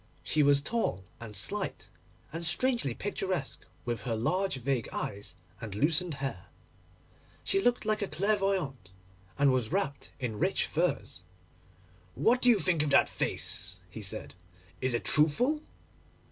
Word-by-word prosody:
She 155 - +2
was 140 -1 +5
tall 145 - -1 0.2
and 110 -3 -8
slight, 95 - -1 0.5
and 165 +1 -4
strangely 175 - +1
picturesque 190 -7 -3 0.2
with 120 -1 -2
her 115 -3 -2
large 185 - 0
vague 130 -2 -1
eyes 100 0 -4 0.3
and 110 -4 -5
loosened 160 - +3
hair. 135 -10 -4 1.0
She 195 - +2
looked 245 +1 +2
like 215 0 +1
a 200 - 0
clairvoyante, 190 - 0 0.5
and 140 -1 +5
was 125 -4 0
wrapped 140 +1 -2
in 115 -5 -3
rich - - +2
furs. - - -1 0.9
'What 245 +2 +3
do 250 - +5
you 235 - +7
think 175 -4 +1
of 150 - 0
that 140 - +5
face?' 90 +1 -2
he 110 - -7
said; 105 +2 -1 0.5
'is 130 -2 +2
it 120 - -2
truthful? 240 - +3
145 Hz, 145 wpm, -30 LUFS, 120-195 Hz, 1.0 s, you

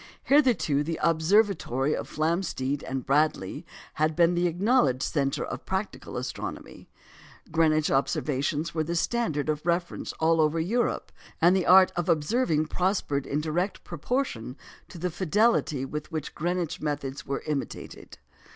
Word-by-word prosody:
Hitherto 250 - +3
the 165 +2 -3
observatory 160 - +2
of - - -5
Flamsteed 155 -4 -1
and 130 -1 -3
Bradley 140 -9 0 0.3
had 155 0 0
been 170 +1 +4
the 175 0 +2
acknowledged 170 - +2
centre 140 -3 -1
of - - -6
practical - - -4
astronomy; - - -6 0.6
Greenwich 155 -2 +2
observations 145 +3 0
were 160 -1 0
the 170 +2 -3
standard 165 - 0
of 150 -1 -1
reference 175 0 -1
all 165 0 +2
over 155 +1 +2
Europe; 225 +9 -1 0.3
and 175 +3 +5
the 185 - 0
art 185 0 +7
of 175 0 -2
observing 160 0 +1
prospered 180 -5 -1
in 145 +2 -1
direct 175 +5 -2
proportion 170 - -3 0.3
to - - -11
the 180 +2 -2
fidelity 185 - +1
with 150 +4 -6
which 155 -3 -4
Greenwich 175 0 -2
methods 145 -1 -4
were 140 - -3
imitated. 150 -3 -5
160 Hz, 140 wpm, -27 LUFS, 145-180 Hz, 0.6 s, art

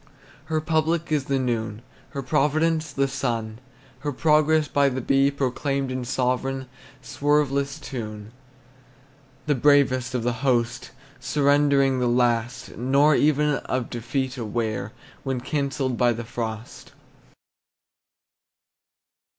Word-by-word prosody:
Her 160 -1 -1
public 160 +1 0
is 145 -3 +1
the 140 -1 0
noon, 115 -3 -2 0.3
Her 140 -2 -5
providence 155 +4 +1
the 135 +1 +1
sun, 115 -5 -3 0.4
Her 145 +2 -3
progress 155 +2 +3
by 140 -1 +3
the 130 0 -3
bee 135 +2 +3
proclaimed 140 0 -2
In 130 -1 -3
sovereign, 130 +1 -1 0.4
swerveless 140 0 0
tune. 110 -7 -7 1.1
The 150 - +2
bravest 130 -2 +3
of 120 - -1
the 120 0 0
host, 120 -3 0 0.3
Surrendering 140 -2 +2
the 125 - +1
last, 120 +1 0
Nor 140 +5 +3
even 150 0 +2
of 130 -2 -3
defeat 130 +2 -3
aware 110 -1 -3 0.3
When 130 -2 -2
cancelled 135 -1 -2
by 120 -1 +4
the 115 0 -6
frost. 110 -1 -6
135 Hz, 115 wpm, -24 LUFS, 120-145 Hz, 1.1 s, by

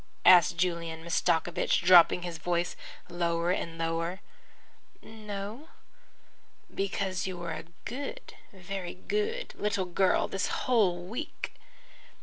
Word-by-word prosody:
asked 175 -1 +7
Julian 170 -2 -1
Mastakovich, 170 +1 +1
dropping 180 0 +7
his 170 -2 -5
voice 175 +1 -1 0.3
lower 170 0 0
and 165 -3 -3
lower. 165 +2 -2 0.8
"No." 215 +5 -7 1.0
"Because 195 -1 -2
you 185 -1 -4
were 175 -1 -5
a 155 - -7 0.2
good, 285 - -6 0.2
very 190 -1 -6
good 425 - -2
little 205 -2 -1
girl 180 +1 +2
the 195 - -5
whole 195 -8 +2
week." 220 +7 -5
180 Hz, 110 wpm, -29 LUFS, 170-200 Hz, 1.0 s, asked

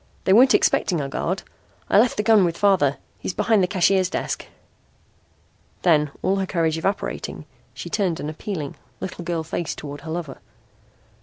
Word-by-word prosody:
They 190 - +3
weren't 255 +5 +7
expecting 175 -4 +2
a 140 - -2
guard. 180 +7 -2 0.4
I - - +5
left 240 +2 +3
the 210 - +1
gun 220 -3 +5
with 170 -1 0
father. 185 -9 +3 0.2
He's 180 - -4
behind 210 0 +3
the 180 - +2
cashier's 185 0 +2
desk." - - -3 1.4
Then, 150 -4 +4
all 195 +1 +2
her 190 -1 -1
courage 165 -3 0
evaporating, 195 +4 -3 0.3
she - - -7
turned 185 -6 -1
an - - -4
appealing, 155 -2 -5 0.2
little 185 -2 -6
girl 170 -1 -2
face 160 0 -3
toward 145 -1 -8
her 160 - -9
lover. 160 -4 -5
180 Hz, 165 wpm, -23 LUFS, 160-195 Hz, 1.4 s, weren't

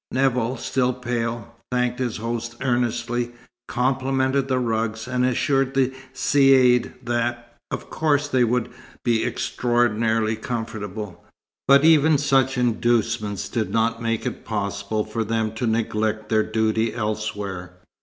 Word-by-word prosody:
Nevill, 130 -1 +1
still 125 -1 0
pale, 120 -2 -3 0.2
thanked 125 0 0
his 125 -4 -2
host 115 +1 -4
earnestly, 120 -1 -1 0.3
complimented 130 +1 0
the 130 -1 +1
rugs, 110 -2 -1
and 125 0 0
assured 135 +1 +1
the 130 -1 +2 0.2
Caïd 130 -3 +4
that, 120 0 -2
of - - -6
course, 145 -2 +1
they 130 -3 +2
would 120 0 0 0.4
be 115 -2 +2
extraordinarily 115 -2 +1
comfortable, 110 -4 -5 0.4
but 140 +2 +6
even 160 -1 +6
such 135 -2 +2
inducements 115 -3 0
did 110 -2 -2
not 115 0 0
make 115 -1 -1
it - - -4
possible 100 0 -2
for 110 +1 -2
them 110 0 -1
to 115 +2 -2
neglect 110 -1 -1
their 110 -1 +3
duty 110 +1 0
elsewhere. 105 -5 -3
120 Hz, 125 wpm, -23 LUFS, 110-125 Hz, 0.4 s, but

